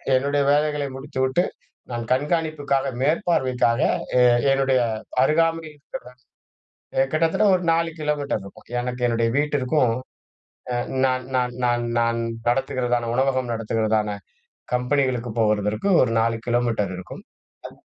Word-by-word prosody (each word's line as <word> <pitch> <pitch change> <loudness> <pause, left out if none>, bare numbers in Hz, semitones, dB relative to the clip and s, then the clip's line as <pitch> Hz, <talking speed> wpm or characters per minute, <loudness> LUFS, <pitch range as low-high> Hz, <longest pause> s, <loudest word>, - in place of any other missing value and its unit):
என்னுடைய 140 +2 +1
வேலைகளை 150 -1 +1
முடித்துவிட்டு 135 +3 0 0.5
நான் 120 -1 -3
கண்காணிப்புக்காக 145 -1 0 0.2
மேற்பார்வைக்காக 130 - +1 0.4
எ - - +6 0.3
என்னுடைய 135 -1 +2 0.4
அருகாமையில் 165 0 +1 0.2
இருக்கிற, - - -6 1.1
கிட்டத்தட்ட 165 +6 +2
ஒரு 180 -1 0
4 165 0 +1
கிலோமீட்டர் 145 -8 -1
இருக்கும், 100 - -14
எனக்கு 125 0 -3
என்னுடைய 115 -1 +1
வீட்டிற்கும், 145 -4 +1 0.8
அ - - 0 0.3
நான் 130 -1 -1
நான் 125 -1 0
நான் 120 0 +1 0.2
நான் 115 0 +1 0.3
நடத்துகிறதான 120 -1 0
உணவகம் 130 -2 +1
நடத்துகிறதான 110 -2 0 0.6
கம்பெனிகளுக்கு 125 -2 0
போவதற்கு, 105 - +1
ஒரு 120 - +1
4 115 0 +1
கிலோமீட்டர் 120 -5 0
இருக்கும். 90 - -9 0.4
அத் - - -14
130 Hz, 110 wpm, -23 LUFS, 115-145 Hz, 1.1 s, எ